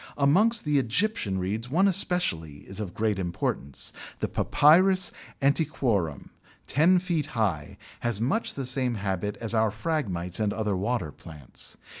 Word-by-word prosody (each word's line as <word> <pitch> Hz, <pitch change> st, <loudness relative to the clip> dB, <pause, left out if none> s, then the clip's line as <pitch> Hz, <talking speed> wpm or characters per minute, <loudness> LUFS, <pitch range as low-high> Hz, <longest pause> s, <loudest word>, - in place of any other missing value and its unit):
Amongst 190 Hz, +12 st, +3 dB
the 150 Hz, -1 st, +3 dB
Egyptian 125 Hz, -, 0 dB
Reeds 105 Hz, +6 st, -3 dB
one 185 Hz, +8 st, +3 dB
especially 175 Hz, -, +1 dB
is 95 Hz, +2 st, -7 dB
of 95 Hz, -5 st, -5 dB
great 105 Hz, -2 st, 0 dB
importance. 85 Hz, -6 st, -3 dB, 0.3 s
The -, -, -1 dB
Papyrus 185 Hz, +5 st, +4 dB, 0.3 s
antiquorum, 135 Hz, -, 0 dB, 0.3 s
ten 165 Hz, +6 st, +4 dB
feet 175 Hz, -5 st, -1 dB
high, 90 Hz, -10 st, -1 dB, 0.2 s
has 120 Hz, -4 st, 0 dB
much 165 Hz, -, -1 dB
the 135 Hz, -, -4 dB
same 130 Hz, -1 st, 0 dB
habit 100 Hz, 0 st, -3 dB
as 115 Hz, -1 st, +2 dB
our 110 Hz, -1 st, +3 dB
Phragmites 105 Hz, -, -2 dB
and 105 Hz, -2 st, 0 dB
other 105 Hz, -3 st, -1 dB
water 95 Hz, -4 st, -2 dB
plants. 75 Hz, -4 st, -9 dB
115 Hz, 140 wpm, -27 LUFS, 95-155 Hz, 0.3 s, Papyrus